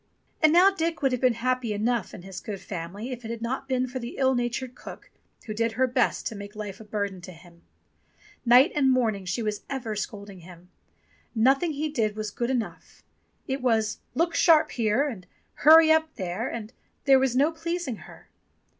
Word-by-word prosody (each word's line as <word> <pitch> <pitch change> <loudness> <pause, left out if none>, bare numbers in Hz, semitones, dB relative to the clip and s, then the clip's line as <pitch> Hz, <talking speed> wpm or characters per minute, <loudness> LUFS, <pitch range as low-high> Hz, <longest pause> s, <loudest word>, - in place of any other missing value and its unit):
And 310 -1 +6
now 360 +4 +6
Dick 330 -4 -2
would 270 - +3
have 250 - -2
been 250 -3 +3
happy 250 -1 -1
enough 225 +1 -1
in - - -10
this 190 0 -8
good 205 -3 -6
family 195 +8 -6
if 245 -1 -7
it 225 - -7
had 230 0 -5
not 260 +3 -3
been 255 -1 0
for 255 +1 -5
the 235 0 -7
ill 265 -1 +3
natured 245 +1 -2
cook, - - -11 0.3
who 215 - -4
did 230 +1 -1
her 255 +3 +2
best 250 -1 0
to 225 - -3
make 205 +1 -9
life 205 -2 -6
a - - -10
burden 200 -3 -4
to 180 - -9
him. 170 0 -17 0.8
Night 250 +7 +6
and 280 -3 +3
morn 245 -4 +2
ing 195 -1 -9
she 180 +6 -2
was 210 -1 -2
for - - -32
ever 245 -6 -4
scolding 200 -2 -6
him. 175 +1 -14 0.7
Nothing 270 +8 +3
he 300 +2 -2
did 225 -8 -1
was 215 -1 -4
good 235 +3 -2
enough. 245 -4 -4 0.4
It 265 0 -2
was 220 -3 +1 0.2
"Look 335 +1 +1
sharp 320 -3 +4
here" 235 +4 +1
and 195 -10 -7 0.3
"Hurry 315 +2 +7
up 315 0 +2
there," 185 +4 -3
and 225 0 -7 0.3
there 270 -2 +6
was 260 -2 +1
no 285 +5 +3
pleasing 330 -6 -4
her. - - -15
240 Hz, 205 wpm, -26 LUFS, 210-270 Hz, 0.8 s, Hurry